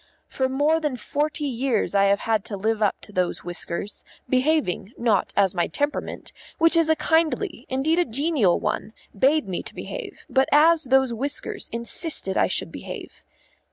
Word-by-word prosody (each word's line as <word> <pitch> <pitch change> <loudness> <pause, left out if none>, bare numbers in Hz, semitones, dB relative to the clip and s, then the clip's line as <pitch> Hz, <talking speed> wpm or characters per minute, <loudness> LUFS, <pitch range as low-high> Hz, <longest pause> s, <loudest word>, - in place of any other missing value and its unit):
For 260 -1 -1
more 295 +4 +2
than 300 -5 -2
forty 295 +5 -2
years 255 -5 0
I 200 0 +4
have 200 0 +2
had 220 -3 0
to 200 - -4
live 220 +2 -1
up 210 - +1
to - - -11
those 180 -3 -1
whiskers, 175 +3 -5 0.2
behaving, 255 - +1
not 220 -5 +1
as 195 -2 +4
my 175 -2 0
temperament, 290 +1 -3 0.3
which 330 +1 +4
is 330 -1 +3
a 315 - +5
kindly, 325 - 0
indeed 290 +6 +1
a 350 - +3
genial 270 - +1
one, 220 - -3 0.2
bade 270 +3 +3
me 180 -2 -3
to - - -11
behave, - - -7
but 265 +1 +2
as 320 +1 +5
those 265 -1 +3
whiskers 290 - -4
insisted 235 - -1
I - - +3
should - - -2
behave. - - -9
265 Hz, 170 wpm, -24 LUFS, 210-310 Hz, 0.3 s, a